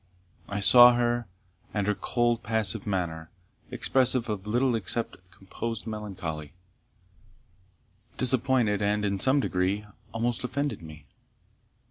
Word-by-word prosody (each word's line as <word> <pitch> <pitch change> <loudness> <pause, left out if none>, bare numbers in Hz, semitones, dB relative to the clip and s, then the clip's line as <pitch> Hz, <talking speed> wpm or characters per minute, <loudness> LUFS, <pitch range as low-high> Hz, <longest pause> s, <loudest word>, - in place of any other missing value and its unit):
I 100 0 -3
saw 120 +3 +8
her; 120 -1 0 0.5
and 105 -2 0
her 105 - +1
cold 120 +2 -1
passive 110 -1 +1
manner, 85 -5 -3 0.4
expressive 130 -3 +2
of 105 -1 -4
little 120 +4 +1
except 115 +1 -2
composed 110 +4 -7
melancholy, 95 -9 -6 1.6
disappointed, 125 -4 +2
and, 105 +1 0
in 100 -1 -1
some 135 +7 +3
degree, 95 0 -1 0.3
almost 115 +2 -2
offended 140 0 -3
me. 75 -2 -12
110 Hz, 110 wpm, -27 LUFS, 100-120 Hz, 1.6 s, saw